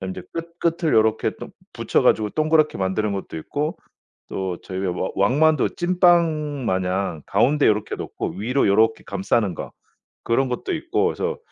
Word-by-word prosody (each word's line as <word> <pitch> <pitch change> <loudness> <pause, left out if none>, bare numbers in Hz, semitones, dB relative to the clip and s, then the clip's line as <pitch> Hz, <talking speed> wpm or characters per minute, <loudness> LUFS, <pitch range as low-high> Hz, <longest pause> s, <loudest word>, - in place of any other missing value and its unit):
그다음에 95 -1 -4
이제 95 - -8
끝 170 +1 -7
끝을 165 -1 0
요렇게 110 0 +2
동 - - -9 0.2
붙여 - - 0
가지고 105 -1 +3
동그랗게 155 -3 +2
만드는 100 +2 0
것도 95 -4 -5
있고 150 - -3 0.5
또 95 -2 -3
저희 95 0 -6
와 90 +1 -2
왕만두 145 +9 +2
찐빵 170 -6 +2
마냥 95 -3 -1
가운데 135 +9 +2
요렇게 105 0 0
놓고 - - -5
위로 125 +4 +1
요렇게 110 +3 +3
감싸는 100 -1 0
거 - - -7 0.5
그런 130 +3 +1
것도 125 - -3
있고 - - 0
그래서 - - -2
110 Hz, 345 characters per minute, -22 LUFS, 95-155 Hz, 0.5 s, 가지고